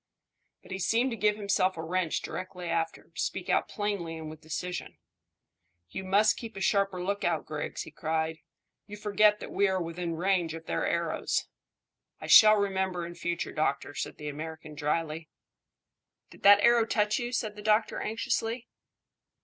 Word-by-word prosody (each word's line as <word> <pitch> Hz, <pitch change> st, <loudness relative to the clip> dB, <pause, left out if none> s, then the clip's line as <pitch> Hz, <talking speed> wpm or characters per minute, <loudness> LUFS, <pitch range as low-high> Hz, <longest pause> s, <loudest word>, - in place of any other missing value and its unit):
But -, -, -15 dB
he 190 Hz, -, -3 dB
seemed 230 Hz, +7 st, +2 dB
to -, -, -2 dB
give 210 Hz, -1 st, +2 dB
himself 195 Hz, -3 st, +1 dB
a 160 Hz, -, -4 dB
wrench 175 Hz, 0 st, -1 dB
directly 185 Hz, -1 st, -6 dB
after, 165 Hz, -1 st, -2 dB
to -, -, -4 dB
speak -, -, -3 dB
out -, -, +2 dB
plainly 200 Hz, -6 st, -3 dB
and 155 Hz, -1 st, -7 dB
with 155 Hz, 0 st, -12 dB
decision. 180 Hz, +3 st, -5 dB, 0.9 s
"You 190 Hz, -, -5 dB
must 205 Hz, +3 st, +3 dB
keep 230 Hz, -2 st, -8 dB
a -, -, -6 dB
sharper 195 Hz, -1 st, +1 dB
lookout, 180 Hz, -4 st, -1 dB
Griggs," 150 Hz, -1 st, -4 dB
he -, -, -11 dB
cried. 160 Hz, 0 st, -2 dB, 0.5 s
"You 210 Hz, 0 st, -8 dB
forget 210 Hz, 0 st, +3 dB
that -, -, -8 dB
we 200 Hz, -, +3 dB
are 190 Hz, -1 st, 0 dB
within 170 Hz, 0 st, -3 dB
range 175 Hz, -2 st, +1 dB
of 165 Hz, 0 st, -9 dB
their -, -, -1 dB
arrows." -, -, 0 dB, 0.7 s
"I -, -, -7 dB
shall 215 Hz, -1 st, +9 dB
remember 190 Hz, -3 st, -1 dB
in 170 Hz, -, -7 dB
future, 170 Hz, 0 st, -3 dB
doctor," 145 Hz, -1 st, -1 dB
said -, -, -5 dB
the 150 Hz, -, -7 dB
American 155 Hz, +1 st, -7 dB
dryly. 155 Hz, +1 st, -2 dB, 1.0 s
"Did -, -, -16 dB
that 205 Hz, 0 st, +8 dB
arrow 235 Hz, -1 st, +5 dB
touch 210 Hz, -1 st, +1 dB
you?" 240 Hz, 0 st, -3 dB
said 220 Hz, -4 st, -2 dB
the 210 Hz, -, -9 dB
doctor 215 Hz, +1 st, +2 dB
anxiously. 225 Hz, +2 st, -2 dB
185 Hz, 170 wpm, -29 LUFS, 165-210 Hz, 1.0 s, shall